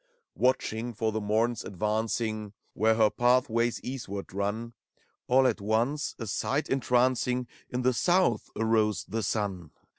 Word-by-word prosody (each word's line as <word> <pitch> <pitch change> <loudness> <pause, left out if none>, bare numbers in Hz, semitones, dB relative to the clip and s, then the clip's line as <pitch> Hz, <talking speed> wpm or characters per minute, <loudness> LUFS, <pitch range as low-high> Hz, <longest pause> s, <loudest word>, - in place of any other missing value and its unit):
Watching 120 -2 0
for 110 0 0
the 110 0 -2
Mom's 110 +3 0
advancing 110 +1 -2 0.2
Where 110 +1 +3
her 110 -2 +4
pathways 120 -1 +2
eastward 100 -8 -6
run. 105 +4 -2 0.5
All 130 +1 +4
at 115 -4 +1
once, 115 +8 0
a 115 - -5
sight 135 +7 -1
entrancing, 125 -1 +1 0.2
In 125 0 -2
the 130 +1 +3
South 175 - +2
arose 110 -2 +1
the 110 +3 -2
sun. 100 -5 -2
115 Hz, 130 wpm, -28 LUFS, 105-125 Hz, 0.5 s, her